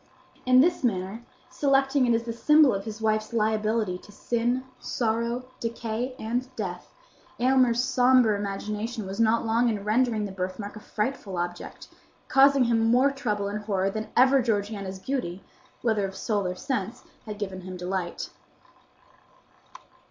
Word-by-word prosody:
In 255 0 +7
this 345 0 +2
manner, 195 -1 -1 0.3
selecting 270 -1 +2
it 235 - +4
as 230 - -1
the 230 -1 -4
symbol 300 +2 +5
of 195 0 -3
his 220 0 -7
wife's 215 0 0
liability 215 -3 0
to 205 - -16
sin, 240 +4 -1 0.2
sorrow, 235 +1 -1 0.2
decay, 230 +2 -3
and 240 +4 -2
death, 180 -5 -5 0.5
Aylmer's 250 -1 +3
sombre 250 -3 +4
imagination 210 +2 -4
was 195 +3 -6
not 230 +1 +3
long 230 +2 +2
in 210 -3 -2
rendering 220 0 +1
the 200 - -6
birthmark 190 +2 -5
a - - -8
frightful 210 -3 -3
object, 175 0 -5 0.4
causing 275 0 +6
him 230 -2 +2
more 255 +4 +4
trouble 210 -7 -2
and 210 +1 -5
horror 195 -2 0
than 215 +2 -4
ever 265 +2 +6
Georgiana's 205 -4 -2
beauty, 195 -5 -4 0.4
whether 215 -4 +1
of 190 - -10
soul 205 -2 -1
or 180 - -3
sense, 240 -1 -3 0.2
had 210 -1 -5
given 190 -3 -5
him 185 0 -7
delight. 180 -1 -4
220 Hz, 150 wpm, -26 LUFS, 200-245 Hz, 0.5 s, In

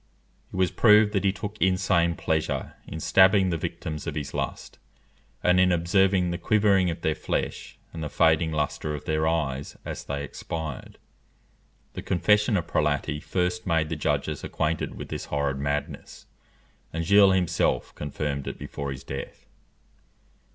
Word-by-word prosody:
It - - -9
was 95 -2 +2
proved 105 -2 +5
that 100 - +1
he 95 - +4
took 105 +2 -7
insane 90 -2 +2
pleasure 80 -2 -2
in 80 - -6
stabbing 95 +2 +4
the - - 0
victims 80 -1 -5
of 80 - -3
his 70 -2 -4
lust - - -5 0.6
and 90 +1 +4
in 90 0 +4
observing 90 +1 +2
the 85 - -3
quivering 100 -2 +3
of 85 0 -5
their 80 - +1
flesh, 75 - -4 0.2
and 80 -1 -5
the 75 - -3
fading 80 +1 +3
lustre 75 0 -2
of 75 - -8
their 80 0 0
eyes 70 -4 -2
as - - -5
they 70 0 -4
expired. 80 -1 -6 1.0
The - - -6
confession 105 +3 +2
of 85 - -2
Prelati 75 -2 0
first 90 +2 -2
made 80 -3 +1
the 80 - -2
judges 75 -1 -1
acquainted 75 +1 -2
with - - -8
this - - -5
horrid 70 -2 -1
madness, 70 +1 -4 0.7
and 85 0 -3
Gilles 100 +1 +6
himself 90 -3 0
confirmed 75 -1 -4
it - - -5
before 70 -1 -6
his 65 -1 -7
death. 70 - -7
85 Hz, 160 wpm, -26 LUFS, 75-95 Hz, 1.0 s, Gilles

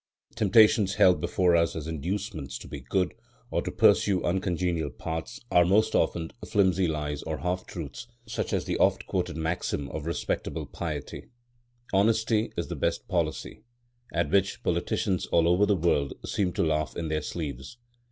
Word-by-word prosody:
Temptations, 105 -1 +4
held 90 -5 +5
before 90 0 +2
us 85 0 +2
as 80 -2 -4
inducements 80 - -4
to - - -11
be - - -7
good 95 -2 -1 0.4
or - - +1
to - - -4
pursue 95 -4 +4
uncongenial 90 -3 0
paths, 80 - -5
are 90 - +6
most 110 +5 +3
often 80 0 0
flimsy 95 -3 +2
lies 75 -2 -2
or 80 -1 -4
half 90 +5 -2
truths, 85 - -7 0.2
such 110 0 -3
as - - 0
the - - -2
oft - - +3
quoted 75 - -2
maxim 80 -3 -2
of 75 +1 -5
respectable 85 - -2
piety, 75 -4 -6 0.7
"Honesty 110 +2 +2
is - - -2
the - - -4
best - - -1
policy," - - -2 0.5
at 85 0 0
which 100 0 +1
politicians 95 -2 0
all 85 -1 +3
over 90 +4 +4
the 105 - +3
world 80 -5 +1
seem 95 -3 0
to - - +1
laugh 75 -1 0
in 80 -2 -3
their 75 0 0
sleeves. 75 - -6
85 Hz, 160 wpm, -27 LUFS, 80-100 Hz, 0.7 s, are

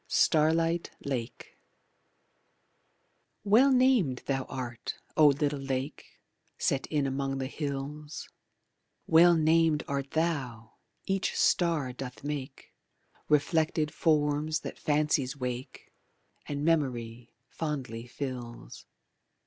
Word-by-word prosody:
Starlight 165 +2 +2 0.2
Lake 125 -4 -5 1.8
Well 230 +7 +5
named 250 - +3
thou 135 -1 -1
art, 120 -2 -5 0.2
O 155 -1 +7
little 145 0 +1
lake 135 +1 -5 0.4
Set 135 - 0
in 150 -3 0
among 135 0 -2
the 135 - -2
hills; 145 +1 -5 0.8
Well 170 +2 +6
named 160 -1 +3
art 140 -1 -2
thou, 135 -9 -2 0.3
each 195 0 -1
star 160 -8 +2
doth 125 0 -8
make 145 -2 -6 0.6
Reflected 155 +1 +2
forms 155 0 +1
that - - -7
fancies 145 -3 +1
wake 125 -1 -6 0.5
And 145 0 -3
memory 120 -7 -1
fondly 130 -7 -4
fills. 120 - -7
145 Hz, 95 wpm, -29 LUFS, 130-160 Hz, 1.8 s, O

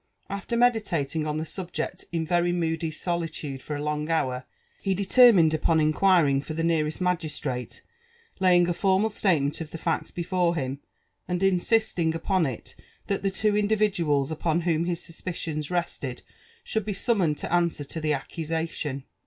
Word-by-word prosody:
After 200 +4 -3
meditating 170 - +1
en 150 0 -1
the 155 - -2
subjeot 175 +2 -5
ia 165 -2 -1
very 175 +1 +2
moody 165 -2 -1
solitude 155 -4 -3
for 150 - -5
a 145 - -4
long 150 +1 -2
hour, 130 -5 0 0.4
ha 195 - +1
determined 195 -4 +6
upon 160 +1 +2
iflquirtn{[ 155 -2 +3
for 155 - -6
the 165 - -1
aearaaC 155 -2 +1
magistrate, 155 -8 -2 0.6
laying 180 -2 +5
a 175 - +1
formal 195 +4 +2
sUtement 165 -8 +1
of 160 - -6
the 165 - -7
facls - - -1
be 175 - -4
fore 175 -1 +1
him, 135 -2 -3 0.5
arid 180 +1 -1
insisting 185 -3 +2
upon 175 0 +1
it 125 -4 -6 0.3
that 200 - -1
the 195 - +1
two 210 +2 +1
individuals 195 -9 +1
upon 160 +1 0
whom 165 -1 +1
his 175 -1 -2
suspicioas 165 -3 -5
rested 170 -7 -3 0.4
should 220 - -1
be 210 +1 -3
summoned 190 -7 +1
to - - -4
answer 170 -4 +1
to 160 +3 -6
the 155 -1 0
accusation. 155 -1 -3
165 Hz, 160 wpm, -26 LUFS, 155-185 Hz, 0.6 s, determined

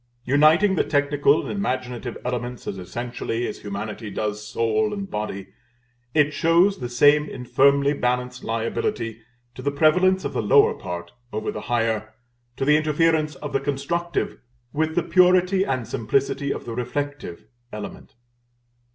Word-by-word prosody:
Uniting 155 +9 +4
the - - +3
technical 145 0 +2
and - - -5
imaginative 125 - -3
elements 125 0 -4
as 95 - -4
essentially 120 +4 -4
as - - -6
humanity 105 +2 -5
does 105 0 -3
soul 115 - 0
and 195 -1 -6
body, 100 -2 -4 0.7
it 150 -1 +3
shows 170 +6 +3
the 120 - -4
same 145 +4 +4
infirmly 140 +3 +2
balanced 125 -1 -2
liability 115 - -2 0.3
to 130 - -9
the 140 - 0
prevalence 180 +6 +3
of - - -3
the - - 0
lower 450 0 +5
part 85 0 -7 0.2
over 110 +1 -3
the - - -6
higher, 110 -2 0 0.4
to 135 - -1
the 150 +1 +5
interference 155 0 +1
of 145 - -7
the 135 - +2
constructive, 160 +5 -2 0.3
with 160 +1 0
the 175 - +2
purity 185 +2 +4
and 130 - -2
simplicity 140 +4 -1
of - - -5
the 115 - -5
reflective, 140 -6 -4 0.3
element. 105 +1 -8
140 Hz, 145 wpm, -23 LUFS, 115-160 Hz, 0.7 s, lower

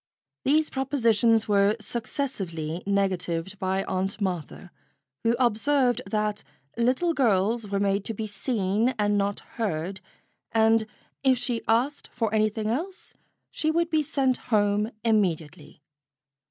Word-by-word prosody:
These 305 +3 +3
propositions 230 -5 +2
were 205 0 +3
successively 195 - -3
negatived 190 -2 -1
by 190 +1 0
Aunt 190 +2 -2
Martha, 180 -2 -4 0.5
who 230 +1 +3
observed 250 +2 +2
that 210 -1 -1 0.3
little 255 +9 +1
girls 225 -3 +1
were 200 0 -1
made 200 0 +1
to 225 - -4
be 220 - -3
seen 215 +2 0
and 205 -1 +2
not 200 0 0 0.2
heard, 190 -1 -2 0.5
and 225 0 +3 0.3
if 265 -2 +4
she 240 -1 -1
asked 250 +6 +1
for 225 -3 -2
anything 215 0 +1
else, 325 - -3 0.4
she 310 - -1
would 335 +1 +1
be 315 -1 +3
sent 270 -3 +1
home 210 -1 +2
immediately. 170 -9 -1
215 Hz, 125 wpm, -26 LUFS, 195-245 Hz, 0.5 s, if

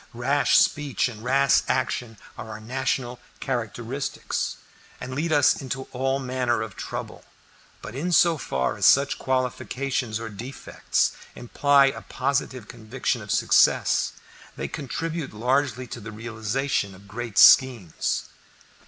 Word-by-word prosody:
Rash 135 +4 +2
speech 145 -4 +2
and 110 -3 -9
rash 135 +2 +3
action 115 -3 -1 0.2
are - - -8
our 110 -1 -7
national 125 +1 -2 0.2
characteristics, 120 +1 -3 0.4
and 130 0 -6
lead 155 +5 -2
us 145 -1 +4
into 130 0 -4
all 135 +1 0
manner 125 -3 -1
of 110 -3 -8
trouble, - - -6 0.6
but - - -7
in 155 +8 -3
so 170 0 +5
far 65 - -2
as - - +1
such 140 +1 +4
qualifications 130 -2 -2
or 115 - -5
defects 115 +6 -2 0.2
imply 140 +3 +3
a 135 - -1
positive 130 -4 -2
conviction 120 +1 -3
of 105 - -11
success, - - +3 0.4
they - - -4
contribute 160 -1 -5
largely 130 +2 0
to 120 - -8
the 110 0 -8
realization 110 0 -2
of 100 +2 -17
great 115 +1 -6
schemes. 120 - +5
125 Hz, 130 wpm, -25 LUFS, 115-140 Hz, 0.6 s, so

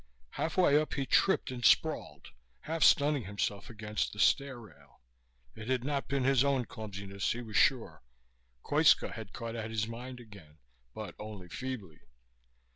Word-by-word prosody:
Halfway 160 -3 +3
up 155 - -4
he 140 - -1
tripped 190 -1 +2
and 125 -1 -6
sprawled, - - +2 0.3
half 160 +1 -4
stunning 145 -5 +4
himself 100 0 -3
against 105 -1 -3
the - - -11
stair 140 0 +2
rail. 70 - -17 0.5
It 110 - -9
had 130 -2 +1
not 140 0 -2
been 140 -1 0
his 135 0 +4
own 135 -3 +1
clumsiness, 100 -3 -4
he 120 +1 -6
was 110 -3 -9
sure. 115 - +2 0.6
Koitska - - +4
had 110 -4 -8
caught 115 -1 -6
at 110 -1 -4
his 110 -1 -1
mind 125 +2 -7
again, 100 -10 -14 0.4
but 105 -5 -6
only 105 -4 -8
feebly. 110 -12 -6
115 Hz, 155 wpm, -31 LUFS, 105-135 Hz, 0.6 s, stunning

